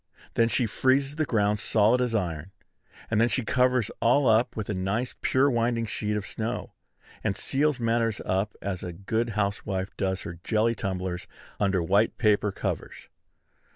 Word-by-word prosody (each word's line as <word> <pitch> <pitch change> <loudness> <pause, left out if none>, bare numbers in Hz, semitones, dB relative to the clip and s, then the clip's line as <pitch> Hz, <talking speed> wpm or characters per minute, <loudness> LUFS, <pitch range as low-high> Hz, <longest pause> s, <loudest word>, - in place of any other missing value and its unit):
Then 115 0 +3
she 120 - +2
freezes 135 +6 +1
the 155 -2 0
ground 105 -2 +1
solid 110 +3 +3
as 120 -2 0
iron; 85 -4 -2 0.6
and 110 0 +3
then 115 - +5
she 125 -2 -1
covers 125 -2 +2
all 125 +4 +4
up 115 +2 +3
with 110 -2 -4
a - - -2
nice 100 +6 -1
pure 130 +2 +3
winding 115 -2 +1
sheet 105 0 -2
of 105 - -4
snow, 110 +1 -4 0.5
and 100 - -1
seals 145 0 +1
matters 115 -1 +1
up 95 +3 -1
as 95 -3 -3
a 90 - -5
good 110 +6 -1
housewife 100 -2 -2
does 95 -1 -1
her 85 -1 -7
jelly 110 +1 +2
tumblers 95 -4 -4 0.3
under 95 -3 +1
white 100 +6 +2
paper 105 -3 +2
covers. - - -5
110 Hz, 165 wpm, -27 LUFS, 100-120 Hz, 0.6 s, then